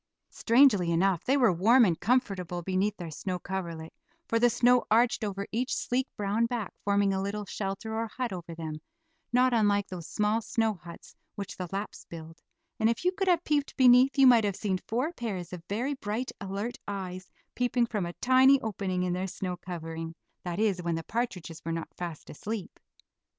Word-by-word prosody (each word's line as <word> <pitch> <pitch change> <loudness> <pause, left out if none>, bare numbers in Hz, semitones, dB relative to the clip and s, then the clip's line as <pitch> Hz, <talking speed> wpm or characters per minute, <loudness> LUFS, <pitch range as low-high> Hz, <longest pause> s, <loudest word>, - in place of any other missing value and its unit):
Strangely 230 -7 +4
enough 175 +1 +2
they 270 +2 +3
were 245 -8 +4
warm 230 +8 +5
and 170 -5 0
comfortable 195 -7 0
beneath 195 +3 0
their 170 -3 -6
snow 180 +4 -3
coverlet, 170 -4 -5 0.3
for 230 - +1
the 240 +1 +5
snow 245 +1 +4
arched 230 +1 +3
over 200 -1 -3
each 245 +4 -1
sleek, 255 +2 -1
brown 210 +3 +1
back, 230 -5 -4
forming 200 -1 +2
a 190 - -1
little 205 +1 -3
shelter 195 +3 -4
or 225 +1 -1
hut 245 0 -4
over 170 -2 -7
them, 155 -2 -6 0.5
not 250 +1 +4
unlike 205 -3 +3
those 180 -4 -8
small 210 +2 +1
snow 220 0 0
huts 170 -2 -13 0.2
which 200 -2 -6
the 180 - -5
Laps 200 +2 -5
build; 165 -1 -10 0.4
and 220 0 +4
if 235 +9 -2
you 360 - +4
could 385 +1 -2
have 350 -2 +3
peeped 295 -2 0
beneath, 255 +2 +6
you 270 - +7
might 240 -3 +7
have 200 -2 0
seen 195 -3 -1
four 255 +9 -1
pairs 190 - -5
of 180 - -6
very 240 +8 -1
bright, 235 0 -3
alert 200 +4 -4
eyes 185 -2 -5 0.2
peeping 245 -1 +1
from 210 -6 -2
a 170 - -6
tiny 260 +4 +5
opening 190 -4 -2
in 180 -1 0
their 185 +1 -2
snow 180 -1 -4
covering; 165 -2 -6 0.3
that 175 -1 -4
is, 205 -4 +1
when 170 -1 -1
the 165 - -4
partridges 180 -9 -4
were 165 - -3
not 165 0 -4
fast 170 -3 -6
asleep. 210 +4 -6
205 Hz, 190 wpm, -29 LUFS, 180-240 Hz, 0.5 s, you